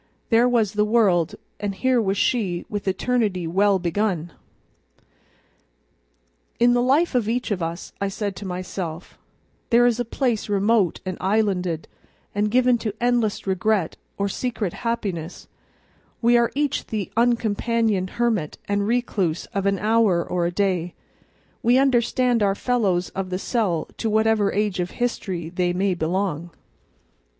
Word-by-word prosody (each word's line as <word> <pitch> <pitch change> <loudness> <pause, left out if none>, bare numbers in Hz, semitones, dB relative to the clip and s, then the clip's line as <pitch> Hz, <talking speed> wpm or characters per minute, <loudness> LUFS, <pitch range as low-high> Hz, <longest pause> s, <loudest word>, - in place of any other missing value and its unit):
There 235 +2 +5
was 225 -5 +2
the 210 0 +2
world, 210 -7 +2 0.2
and 200 -1 -3
here 255 +3 +2
was 195 -1 0
she 190 -7 0
with 205 -1 -5
eternity 200 -3 0
well 195 +4 +3
begun. 175 -2 -1 2.3
In 240 +1 +5
the 245 - +3
life 285 +7 +2
of 235 -4 +1
each 245 0 -1
of 190 -3 -1
us, 165 +1 -5
I 200 - +1
said 200 0 -3
to 205 - -7
myself, 180 -2 -6 0.5
there 240 +1 +5
is 240 -1 +2
a - - +1
place 235 -2 -1
remote 205 -2 +2
and 185 -1 -4
islanded, 185 -5 0 0.5
and 210 +1 +1
given 250 +1 +3
to 215 -2 -3
endless 240 -3 +1
regret 190 -1 0 0.2
or 200 - 0
secret 215 -3 -3
happiness; 195 -8 -4 0.7
we 240 +1 +4
are 235 -1 +3
each 290 -1 -1
the 210 -4 -3
uncompanioned 230 -3 +1
hermit 225 -10 0
and 200 0 0
recluse 210 -8 0
of 200 -1 0
an 200 0 +2
hour 210 -4 +2
or 175 -1 0
a - - -2
day; 180 -2 -1 0.7
we 240 +2 +4
understand 250 -2 +2
our 195 -1 +2
fellows 200 -7 0
of 190 -1 -4
the 185 - -2
cell 195 -6 -1
to 225 - 0
whatever 220 -1 +2
age 205 -2 -1
of 180 0 -1
history 190 -9 -2
they 180 0 0
may 190 +1 +1
belong. 175 0 -2
205 Hz, 145 wpm, -23 LUFS, 185-235 Hz, 2.3 s, There